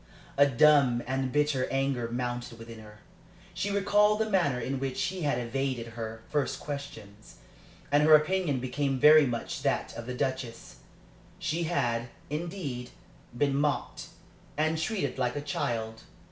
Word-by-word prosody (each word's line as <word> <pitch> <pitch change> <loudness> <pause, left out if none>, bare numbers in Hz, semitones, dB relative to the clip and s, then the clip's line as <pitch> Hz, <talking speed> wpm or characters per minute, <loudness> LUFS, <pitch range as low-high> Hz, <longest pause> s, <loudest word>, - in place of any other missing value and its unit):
A 140 +1 +6
dumb 135 -2 +4
and 130 0 -1
bitter 145 -2 +1
anger 135 -3 -1
mounted 120 0 -4
within 115 0 -10
her. 105 -1 -14 0.5
She 205 - -2
recalled 205 +1 +3
the 220 0 0
manner 145 -10 +2
in 130 +2 -3
which 135 -1 -3
he 185 +1 -2
had 145 -5 +1
evaded 125 0 -2
her 110 -1 -7
first 145 -2 -1
questions, 110 -8 -8 0.6
and 145 +1 +5
her 155 +1 +8
opinion 155 -2 +1
became 135 +2 -1
very 150 +1 +7
much 120 -1 -4
that - - -1
of 115 0 -7
the 125 - -4
Duchess. 125 - -4 0.6
She 165 +2 -2
had, 120 -8 -1 0.2
indeed, 150 -6 -4 0.5
been 140 +1 +2
mocked, 145 +1 -1 0.5
and 160 +1 +1
treated 190 -4 -2
like 125 -1 0
a - - -1
child. 115 -6 -3
135 Hz, 145 wpm, -29 LUFS, 120-150 Hz, 0.6 s, her